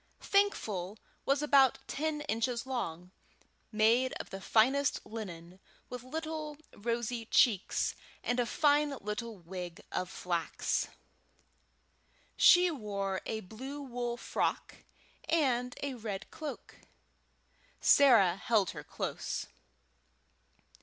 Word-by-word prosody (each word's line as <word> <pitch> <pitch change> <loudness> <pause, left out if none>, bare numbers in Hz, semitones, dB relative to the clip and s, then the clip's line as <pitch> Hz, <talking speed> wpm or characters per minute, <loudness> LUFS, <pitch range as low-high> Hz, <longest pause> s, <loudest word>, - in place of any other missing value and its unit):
Thankful 215 - 0 0.3
was 275 +2 +2
about 275 -3 +5
ten 305 0 -2
inches 235 0 -1
long, 180 -9 -4 0.6
made 230 +4 +3
of - - -7
the 195 - -6
finest 265 +8 +3
linen, 185 -5 -8 0.3
with 250 -1 -6
little 310 +2 -5 0.2
rosy 235 +1 -2
cheeks, 215 -7 +3 0.3
and 245 +1 0
a 240 - +1
fine 290 0 +2
little 210 +2 -5
wig 175 -1 -7
of 185 -1 -2
flax. 175 -3 -1 1.5
She 355 0 +7
wore 200 -7 -3
a 220 -1 -2
blue 260 +9 -8
wool 240 -2 -3
frock - - -2 0.5
and 250 -6 +1
a 280 -1 -2
red 215 -4 -6
cloak. 305 -2 -7 1.0
Sarah 225 -11 +6
held 210 -3 +2
her - - -8
close. - - -4
235 Hz, 105 wpm, -32 LUFS, 200-280 Hz, 1.5 s, She